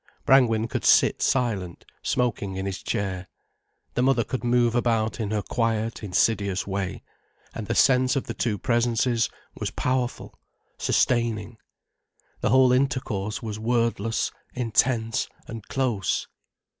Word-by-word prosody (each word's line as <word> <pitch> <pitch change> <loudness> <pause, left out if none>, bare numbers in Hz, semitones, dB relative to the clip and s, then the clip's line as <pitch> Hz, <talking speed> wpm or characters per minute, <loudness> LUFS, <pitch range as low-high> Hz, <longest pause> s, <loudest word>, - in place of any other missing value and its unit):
Brangwen 115 -4 +4
could - - -3
sit - - +4
silent, 105 -9 -1 0.2
smoking 105 -6 -1
in 95 0 -3
his 95 -1 -4
chair, 95 -2 -3 0.7
the - - 0
mother 130 -2 +3
could 130 +3 -4
move 120 -1 +3
about 115 -2 0
in 110 -3 -2
her 105 -1 -1
quiet, 115 -1 -1
insidious 100 -1 +1
way, 95 -1 -3 0.5
and 110 -3 -6
the - - -1
sense 130 0 +4
of 135 - 0
the 115 - -5
two 110 -1 -1
presences 120 +1 +1 0.2
was - - -3
powerful, 125 -1 -2 0.4
sustaining. 115 -2 0 0.8
The - - 0
whole 130 +1 +5
intercourse 125 -6 -1
was 110 -1 -5
wordless, 115 -1 0 0.2
intense 115 -1 +1 0.2
and 115 -3 -8
close. 120 - -1
115 Hz, 130 wpm, -25 LUFS, 105-125 Hz, 0.8 s, whole